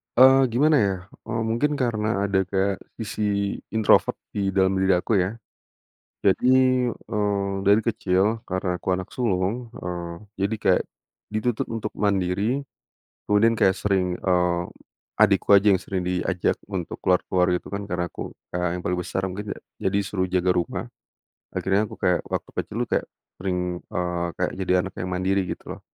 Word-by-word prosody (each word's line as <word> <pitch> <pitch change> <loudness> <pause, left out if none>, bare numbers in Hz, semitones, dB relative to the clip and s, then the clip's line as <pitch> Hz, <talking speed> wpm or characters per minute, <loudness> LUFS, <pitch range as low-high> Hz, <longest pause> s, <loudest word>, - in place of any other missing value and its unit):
Eee, 130 +1 +7
gimana 150 +7 +3
ya, 100 -2 +2 0.3
eee, 115 +1 -1
mungkin 145 +7 +1
karena 110 -6 0
ada 95 -1 +2
kayak 95 0 0 0.2
sisi 110 0 -4 0.5
introvert 110 -2 +4 0.2
di 100 -2 0
dalam 95 0 +3
diri 95 0 +4
aku 95 +3 +1
ya. 95 +5 0 0.9
Jadi, 100 +5 +3 0.4
eee, 100 -3 -2
dari 105 +2 +6
kecil 110 0 +1
karena 95 -1 -1
aku - - -15
anak 95 -1 -6
sulung, 115 +1 -1
eee, 85 -1 -5 0.3
jadi 105 +3 +1
kayak - - +4 0.5
dituntut 110 +2 -1
untuk 110 -2 -3
mandiri, 100 +6 0 0.7
kemudian 110 +3 +4
kayak 95 - +4
sering, 95 -3 0
eee, 90 -1 +1 0.5
adikku 100 -1 +4
aja 100 +1 +6
yang 95 - +1
sering 95 -2 -3
diajak 90 0 0
untuk 90 -4 -4
ke - - -22
luar-ke 90 - +2
luar, 90 -1 +3
gitu - - -12
kan, 100 0 -3
karena 90 -1 -1
aku - - -7 0.2
kakak 90 0 0
yang - - -6
paling 90 0 0
besar 95 +1 -2
mungkin 105 +3 -6
yak - - -15 0.3
jadi 100 - 0
suruh 95 -2 -1
jaga 90 0 +2
rumah. 90 -1 -2 0.7
Akhirnya 95 +2 +1
aku - - -9
kayak 90 -1 +2
waktu - - -3
kecil, - - -10
tuh - - -38
kayak - - -10 0.3
sering, 95 -1 -1 0.2
eee, 90 -1 -2
kayak 90 - 0
jadi 95 -1 0
anak 95 - -8
yang 90 +1 -3
mandiri, 95 +2 +1
gitu - - -6
loh. - - -23
95 Hz, 165 wpm, -24 LUFS, 90-105 Hz, 0.9 s, Eee